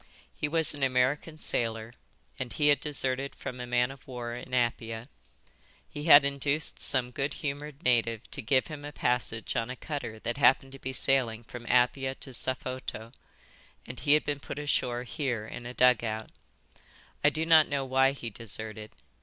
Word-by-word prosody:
He - - -2
was 160 +1 +1
an 145 - -9
American 135 +4 +1
sailor, 115 -5 -1 0.5
and 130 -2 -4
he 150 -1 +2
had 145 - +4
deserted 135 -2 -1
from 125 - -7
a 125 - -5
man 125 +1 +2
of 135 0 -14
war 120 -2 -5
in 125 +1 -8
Apia. 115 -2 -1 0.8
He 145 0 -7
had 145 -3 +9
induced 140 +2 -1
some 125 -1 +3
good 140 +3 -2
humoured 145 0 -5
native 115 -3 +2
to - - -2
give 130 +3 +2
him 150 -2 -8
a 145 - -6
passage 125 -5 -1
on 115 -1 -1
a 130 - -4
cutter 140 -7 -5
that 120 +2 -3
happened 135 -1 +4
to 135 - -10
be 130 - -4
sailing 125 -4 +2
from 120 +1 -10
Apia 130 +2 +2
to 135 - -8
Safoto, 130 -3 -4 0.7
and 125 - -7
he 145 - +4
had 150 - +3
been 145 -1 -1
put 140 - -7
ashore 125 -4 -1
here 125 -5 -3
in 120 +2 -8
a 125 - -7
dugout. 115 -3 +2 0.9
I 150 - +7
do 155 +2 -1
not 160 -2 +7
know 140 -2 -1
why 135 +1 +3
he 120 -4 -6
deserted. 110 0 -6
130 Hz, 180 wpm, -29 LUFS, 120-145 Hz, 0.9 s, had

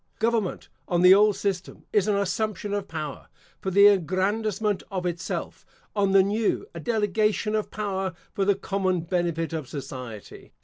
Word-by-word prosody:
Government, 225 -4 0 0.2
on 175 0 +1
the 180 +1 +9
old 205 +1 +5
system, 190 -3 -3
is 210 -1 +3
an 210 - +2
assumption 205 +1 -1
of 200 -1 -2
power, 155 -3 -6 0.3
for 190 - -3
the 200 +2 +6
aggrandisement 205 +2 +2
of 185 -2 -3
itself; 170 -1 -4 0.3
on 200 -2 +2
the 195 0 +6
new, 210 +2 0
a 170 - -6
delegation 215 +1 0
of 215 -1 -1
power 195 -4 -3 0.2
for 195 - 0
the 200 0 +3
common 190 -2 -1
benefit 170 -1 -1
of 155 -5 -4
society. 130 -6 -8
195 Hz, 160 wpm, -26 LUFS, 175-210 Hz, 0.3 s, the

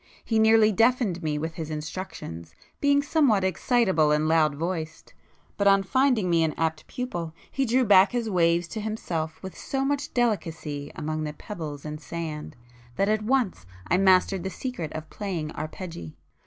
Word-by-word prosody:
He 225 -1 +1
nearly 220 0 +6
deafened 225 -4 +2
me 155 -2 -1
with 160 +2 -3
his 160 -1 -6
instructions, 150 - -6 0.2
being 285 0 +3
somewhat 280 - +3
excitable 190 -4 +2
and 150 +1 +2
loud 155 -2 +3
voiced,—but 165 +4 -5
on 195 0 +5
finding 250 -2 +2
me 170 -2 +3
an 155 -2 -1
apt 160 -1 -1
pupil, 175 -11 -5 0.2
he 270 - 0
drew 250 +2 +3
back 195 -2 +6
his 240 -2 -1
waves 170 -3 +2
to 220 - -4
himself 170 -7 -3
with 190 - -7
so 270 0 -2
much 285 +1 -1
delicacy 165 - -2
among 155 0 -3
the 150 -1 -4
pebbles 155 -6 -7
and 150 0 -6
sand, 155 -1 -6 0.4
that 195 +8 +1
at 215 0 +2
once 215 - 0 0.2
I 180 - +5
mastered 190 0 +4
the 190 - -2
secret 190 - -5
of 155 0 -6
playing 175 -7 -4
arpeggi. 155 - -7
180 Hz, 165 wpm, -26 LUFS, 155-220 Hz, 0.4 s, nearly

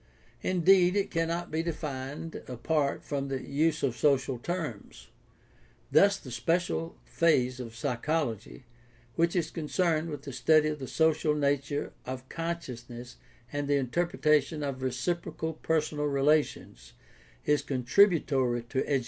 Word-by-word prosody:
Indeed, 185 0 +4
it 200 -1 0
cannot 165 +1 -1
be 160 +1 0
defined 150 -2 -5
apart 140 +3 -1
from 140 -1 -3
the 135 -1 -2
use 155 +2 +1
of 130 -4 +1
social 135 -2 +2
terms. 120 - -5 0.8
Thus 200 0 +5
the 130 - -11
special 165 +7 -1
phase 130 -6 +2
of 115 -3 -7
psychology 120 - -2 0.5
which 170 +1 +2
is 165 -3 0
concerned 165 0 0
with 145 -3 -6
the 140 - -7
study 155 +4 +4
of 150 -1 -4
the 130 - -6
social 155 0 +2
nature 145 0 -1
of 130 0 -6
consciousness 125 -8 -6 0.4
and 145 0 -2
the 145 - +3
inter 140 +6 0
pretation 150 -2 +1
of 130 -2 -5
reciprocal 160 +5 -2
personal 155 -1 -1
relations 140 - 0 0.5
is 150 0 +3
contributory 130 - +2
to 130 - -1
education. 140 -2 +2
150 Hz, 130 wpm, -29 LUFS, 130-165 Hz, 0.8 s, Thus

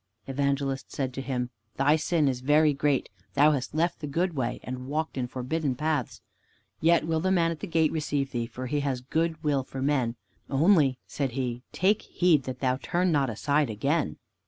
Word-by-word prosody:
Evangelist 140 0 -1
said 130 -2 -2
to 135 - -4
him, 125 -2 -2 0.2
"Thy 145 +3 +4
sin 160 -1 +1
is 125 -2 -1
very 150 +3 +4
great. 140 -1 +1 0.3
Thou 150 +2 +6
hast 135 -1 -2
left 170 +2 +1
the 150 - -5
good 170 +5 0
way 125 -4 -2
and 130 0 -6
walked 155 +3 -2
in 125 -2 -2
forbidden 130 +3 -2
paths. 150 -2 -2 0.6
Yet 165 -1 +4
will 160 -1 0
the 185 - 0
man 170 -3 +3
at 165 - -5
the 205 - -5
gate 160 -2 +2
receive 145 -3 -1
thee, 120 -2 -2
for 130 +2 -7
he 145 +3 -1
has 135 -3 -1
good 160 +4 -1
will 145 -3 +1
for 135 - -8
men. 130 -5 +1 0.3
Only," 145 -3 +4
said 135 -4 -3
he, 125 -2 -2
"take 200 +3 +2
heed 165 -7 +2
that 130 -1 -6
thou 130 -1 +2
turn 180 +1 +1
not 140 -4 +2
aside 140 +5 +1
again." 135 - 0
140 Hz, 195 wpm, -27 LUFS, 130-160 Hz, 0.6 s, Thou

